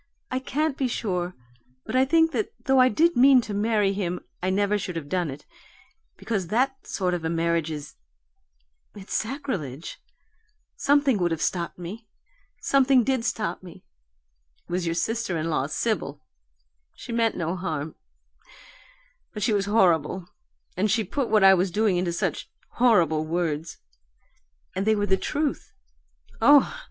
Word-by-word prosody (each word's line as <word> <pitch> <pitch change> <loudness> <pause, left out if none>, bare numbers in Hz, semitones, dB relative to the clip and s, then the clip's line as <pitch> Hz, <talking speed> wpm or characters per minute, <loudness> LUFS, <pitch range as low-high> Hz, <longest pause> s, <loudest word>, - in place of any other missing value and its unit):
I 255 - 0
can't 285 +2 -1
be 265 - +1
sure, 180 -7 -2 0.5
but - - -4
I 260 +1 +5
think 325 +3 +3
that 425 +5 -2
though 265 -1 +4
I 255 0 +6
did 335 +9 +2
mean 265 +1 +7
to 215 - -6
marry 205 -1 +1
him 180 -3 -2 0.2
I 185 - 0
never 205 +2 +1
should 180 -2 -5
have 160 -3 -5
done 175 0 -1
it, 140 +2 -9 0.7
because 200 -6 -3
that 265 +7 -1
sort 185 -2 -1
of 175 -2 -3
a 160 - -1
marriage 165 -1 0
is 150 -2 -7 1.0
it's 200 -1 -9
sacrilege 215 - -4 0.8
something 280 -5 +2
would 175 -1 +1
have 165 -2 -2
stopped 170 0 -2
me. 200 +6 -8 0.5
Something 270 -2 +4
did 260 -1 0
stop 220 -1 -2
me; 180 -2 -13 0.8
it - - -13
was 175 -1 -1
your 165 - -1
sister 225 0 -1
in 160 +1 -2
law, 140 -3 0
Sibyl. 155 - -2 0.7
She - - -9
meant 230 -1 +1
no 170 +1 -2
harm 160 -4 -4 1.4
but 210 - -4
she 225 - +2
was 200 -1 0
horrible, 180 -4 +2 0.5
and 205 +4 +1
she 220 +2 +2
put 250 +6 -2
what 215 -2 +4
I 195 0 +9
was 185 +1 +2
doing 210 +1 +1
into 175 -1 0
such 170 - -3 0.2
horrible 175 -11 +3
words 160 -1 -2 1.0
and 195 +3 -2
they 220 - +4
were 205 -1 0
the 190 -1 +3
truth 295 +7 -3 0.7
oh! 285 - +6
200 Hz, 160 wpm, -25 LUFS, 170-245 Hz, 1.4 s, I